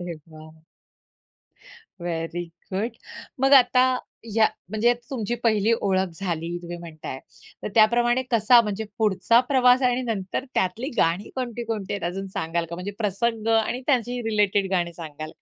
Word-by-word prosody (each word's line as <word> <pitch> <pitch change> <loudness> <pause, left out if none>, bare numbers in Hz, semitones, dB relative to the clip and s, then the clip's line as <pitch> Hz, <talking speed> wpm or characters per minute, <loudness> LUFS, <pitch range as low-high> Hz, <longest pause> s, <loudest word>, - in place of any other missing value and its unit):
अरे 175 -1 -5
वाह. 155 0 -14 1.4
Very 170 0 -3 0.3
good, 215 +5 -1 0.5
मग 270 +1 +3
आता 250 -1 +6 0.5
या 220 -1 +5 0.2
म्हणजे 220 +3 +3 0.2
तुमची 240 -3 -2
पहिली 215 -1 +3
ओळख 190 -1 +1
झाली 170 -2 -3
तुम्ही 175 0 -6
म्हणताय, 155 -5 -8 0.4
तर - - -3
त्याप्रमाणे 240 +3 +4
कसा 235 +1 +6
म्हणजे 210 0 -3
पुढचा 220 +2 +3
प्रवास 255 -1 +5
आणि 250 0 +2
नंतर 215 -2 -3
त्यातली 190 +8 0
गाणी 170 +5 +1
कोणती, 240 -2 -4
कोणती 220 -4 -4
आहेत 200 -4 -3
अजून 195 +1 -5
सांगाल 165 +1 -1
का? - - -4
म्हणजे 180 +4 -5
प्रसंग 220 +1 -1
आणि 225 +3 -1
त्यांची 245 -3 +1
रिलेटेड 205 -2 +1
गाणी 175 -2 0
सांगाल 155 -2 -8
का? - - -20
210 Hz, 150 wpm, -24 LUFS, 175-235 Hz, 1.4 s, आता